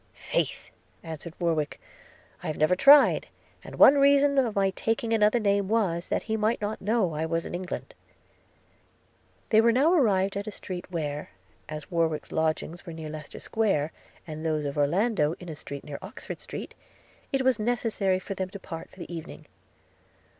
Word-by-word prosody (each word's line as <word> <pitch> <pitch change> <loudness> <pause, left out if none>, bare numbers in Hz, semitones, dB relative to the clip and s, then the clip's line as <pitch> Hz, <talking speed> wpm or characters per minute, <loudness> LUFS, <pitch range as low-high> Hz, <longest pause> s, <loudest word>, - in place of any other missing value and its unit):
'Faith!' - - -2 0.3
answered 160 0 -7
Warwick, 160 -4 -1 0.6
'I - - -6
have 155 - -3
never 155 +4 +3
tried; 280 +8 +6 0.4
and - - -9
one 280 +1 +7
reason 280 0 +5
of 235 -5 0
my 195 -1 +2
taking 225 +3 -1
another 215 +2 +4
name, 200 -2 +1
was, 190 -6 0
that - - 0
he 220 - -2
might 220 +2 +1
not 210 +2 -3
know 205 -4 +1
I 155 +1 -2
was 165 0 -1
in - - -6
England.' 180 +1 -5 1.6
They 220 0 +7
were 230 +1 +5
now 280 +8 +4
arrived 200 - +3
at 200 +1 -4
a - - -3
street 180 -3 -7
where, 150 -4 -3 0.4
as 155 +2 -7
Warwick's 165 -3 0
lodgings 160 +2 -1
were 170 - -8
near 160 -1 -7
Leicester 155 -1 -8
Square, 195 -9 0 0.3
and 155 -1 -7
those 155 -2 0
of 140 - -3
Orlando 165 +2 +2
in 180 - -9
a 155 - -5
street 140 -1 -8
near 145 -2 -7
Oxford 190 +3 -8
Street, - - -7 0.6
it 270 -1 +1
was 255 -3 +3
necessary 215 -4 0
for 190 +2 -5
them 190 -1 -3
to 200 - -9
part 165 -3 -8
for - - -20
the 175 - -7
evening. 160 - -9
190 Hz, 175 wpm, -27 LUFS, 160-220 Hz, 1.6 s, one